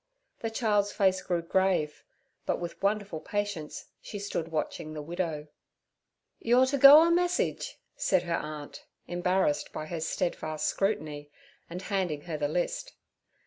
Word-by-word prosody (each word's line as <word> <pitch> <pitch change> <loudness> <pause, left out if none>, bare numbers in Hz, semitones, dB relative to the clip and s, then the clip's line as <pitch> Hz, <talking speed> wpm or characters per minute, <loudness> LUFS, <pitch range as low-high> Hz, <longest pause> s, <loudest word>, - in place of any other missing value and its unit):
The 225 - -2
child's 210 -3 +1
face 190 -2 +2
grew 175 -2 -1
grave, 175 -4 +1 0.4
but - - 0
with 175 -1 -6
wonderful 200 -4 0
patience 205 -5 -4 0.2
she 205 - -7
stood 200 -5 -3
watching 155 -1 -3
the 155 - -5
widow. 160 -2 -3 0.9
'You're 245 +3 +4
to 275 +2 0
go 285 +4 +11
a 335 - +3
message' 355 +1 0 0.2
said 185 -2 +2
her 170 -1 -1
aunt, 150 -1 -7 0.2
embarrassed 175 -3 0
by 155 - -5
her 165 +1 -4
steadfast 155 -2 -2
scrutiny, 155 -8 -1 0.4
and 180 +2 -6
handing 185 -8 -1
her 165 0 -5
the 145 - +1
list. - - -2
180 Hz, 145 wpm, -29 LUFS, 155-205 Hz, 0.9 s, go